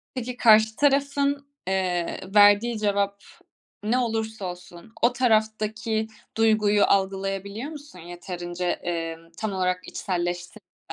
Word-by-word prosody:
Peki, 250 0 -4
karşı 220 -1 +5
tarafın, 280 0 +1 0.2
eee, 185 -2 -1 0.2
verdiği 205 +3 +6
cevap 200 -1 0 0.6
ne 225 +4 +1
olursa 220 -3 -2
olsun 180 +2 -9
o 235 +1 +4
taraftaki 220 -2 0 0.3
duyguyu 215 -2 +3
algılayabiliyor 195 +5 -1
musun 290 - -11
yeterince, 175 +1 -4
eee, 165 -1 -3 0.2
tam 215 -2 -3
olarak 185 -1 -1
içselleştirirken? 175 -1 -4
205 Hz, 105 wpm, -25 LUFS, 180-225 Hz, 0.6 s, verdiği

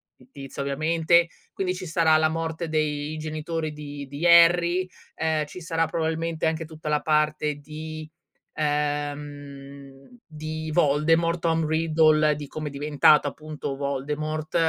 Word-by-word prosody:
fittizia 135 +2 -9
ovviamente, 160 +4 +2 0.2
quindi 185 -1 -2
ci 185 0 -7
sarà 160 -1 +3
la 155 0 +3
morte 165 +1 -3
dei 155 -1 -1
genitori 155 0 -4
di 145 -1 -8
di 145 +5 -5
Harry, 175 +2 +5 0.3
ehm, 160 -1 0
ci 150 - -10
sarà 165 -1 -1
probabilmente 160 0 -2
anche 160 0 -1
tutta 155 -1 -10
la 150 -1 +1
parte 150 -1 +1
di, 155 +1 -8 0.4
ehm, 145 -2 -4 0.2
di 155 0 -6
Voldemort, 165 +2 +2
Tom 165 -1 +1
Riddle, 155 -1 +3
di 145 0 -7
come 155 +1 -5
è - - -12
diventato 145 +1 +4
appunto 155 -3 -6
Voldemort, 150 +3 -3
155 Hz, 130 wpm, -25 LUFS, 145-160 Hz, 0.4 s, Harry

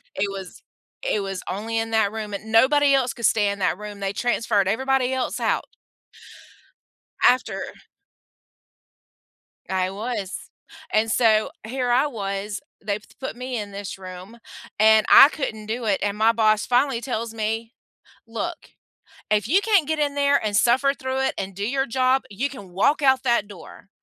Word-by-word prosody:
it 200 +1 -1
was 195 -2 -8 0.4
it 215 - 0
was 195 -2 -4
only 225 +4 -3
in 225 0 -2
that 220 -2 +2
room 215 -2 -5
and 215 +2 -6
nobody 280 +5 +5
else 255 -3 +2
could 235 - -3
stay 205 -2 +3
in 200 0 -4
that 185 - 0
room, 210 -1 -8
they 195 0 -2
transferred 210 -4 0
everybody 265 +2 +1
else 260 -1 -2
out - - 0 1.6
after 250 +1 +3 2.1
I 185 -1 0
was, 210 -2 -4 0.6
and 220 +1 +1
so 220 -3 +3
here 250 +1 -2
I 265 +5 +3
was, 200 -4 -4 0.3
they've 210 0 -2 0.2
put 265 - -5
me 250 0 -5
in 205 -1 -6
this 200 -1 -7
room, 185 +4 -10 0.4
and 220 0 +6
I 280 - +9
couldn't 220 -8 -5
do 230 +1 -3
it, 200 -2 +1
and 205 0 -1
my 220 +1 +4
boss 215 -2 +2
finally 245 -1 +1
tells 230 -3 -4
me, 225 +2 -3 0.5
"Look, - - -5 0.6
if 210 -1 +1
you 370 +10 +3
can't 400 -8 +3
get 315 -1 -1
in 285 -1 0
there 280 -3 +2
and 205 -1 -1
suffer 260 +5 +3
through 260 0 -3
it 265 - 0
and 190 -1 -5
do 200 +2 -3
your 270 +1 0
job, 255 +2 +1
you 250 +8 -2
can 205 -9 -11
walk 245 - +2
out 265 -1 +3
that 235 -5 +1
door," 200 0 -13
225 Hz, 165 wpm, -23 LUFS, 205-260 Hz, 2.1 s, I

